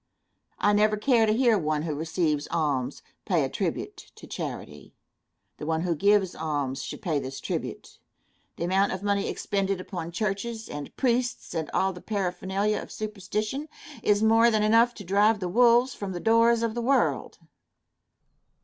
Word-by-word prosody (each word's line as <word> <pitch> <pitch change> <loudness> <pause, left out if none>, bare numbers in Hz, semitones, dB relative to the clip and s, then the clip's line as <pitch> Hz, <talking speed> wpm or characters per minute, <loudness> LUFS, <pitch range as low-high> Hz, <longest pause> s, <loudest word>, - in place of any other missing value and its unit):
I 205 - +3
never 215 +1 +3
care 230 0 +3
to - - +3
hear 230 -2 +3
one 155 -2 -1
who 160 -2 -2
receives 155 -1 -1
alms 145 -6 -1 0.2
pay - - +1
a - - -1
tribute - - -4
to - - -12
charity. - - -7 0.6
The 150 - -6
one 160 0 0
who 175 -1 0
gives 200 +2 +3
alms 145 -4 -2
should - - -7
pay 160 -7 0
this 135 0 -6
tribute. - - -5 0.6
The - - -4
amount 190 +3 +2
of 190 +1 -5
money 200 -1 0
expended 195 -1 -1
upon 175 -2 -6
churches 220 +4 -3
and 145 -1 -8
priests 245 -1 0
and 160 -3 -3
all 190 0 +1
the 180 - -11
paraphernalia 195 +1 -1
of - - -11
superstition, 215 +7 -4 0.3
is 210 -1 +2
more 225 +1 +5
than 215 -2 +2
enough 230 +3 +4
to 205 - -9
drive 205 +4 +3
the 185 - -2
wolves 240 +5 +4
from 195 -2 -5
the 175 - -4
doors 230 +2 +4
of 230 -1 0
the 240 - -3
world. 265 +3 +1
200 Hz, 165 wpm, -26 LUFS, 170-225 Hz, 0.6 s, more